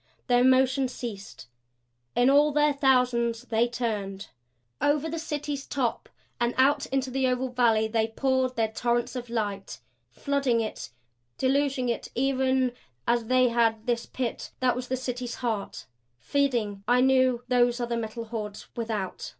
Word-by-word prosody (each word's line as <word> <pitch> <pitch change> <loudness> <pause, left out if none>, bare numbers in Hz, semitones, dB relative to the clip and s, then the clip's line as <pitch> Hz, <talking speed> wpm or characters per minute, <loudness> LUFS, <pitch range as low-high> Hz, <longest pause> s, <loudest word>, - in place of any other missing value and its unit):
Their 245 -1 +3
motion 260 +1 +4
ceased; 225 -5 -8 0.7
in 245 - +4
all 295 +2 +5
their 295 0 +3
thousands 250 -4 +2
they 235 -1 +1
turned. 210 -5 -4 0.5
Over 290 +2 +2
the 325 +1 -4
City's 295 -3 -4
top 250 -5 -2 0.3
and 240 0 0
out 275 +2 +3
into 265 -1 -1
the 265 0 +1
oval 255 +1 0
valley 230 -3 +2
they 220 0 +1
poured 260 +2 0
their 225 -1 +1
torrents 240 +2 -1
of 245 -1 -5
light; 205 -4 -3 0.3
flooding 275 - 0
it, 220 - -4 0.5
deluging 270 -1 +1
it 235 - -2
even 260 0 +1 0.4
as 235 -1 +2
they 255 +1 +3
had 225 -2 +1
this 235 -1 -1
pit 250 -3 -4
that 255 -2 +2
was 250 0 -5
the 260 - -1
City's 250 -1 -4
heart. 225 -5 -3 0.3
Feeding, 225 - -1
I 245 +1 +4
knew, 255 -2 +3
those 245 -1 +2
other 240 -1 -1
Metal 230 0 -4
Hordes 215 -2 -6
without. 220 -5 -4
245 Hz, 150 wpm, -27 LUFS, 230-260 Hz, 0.7 s, all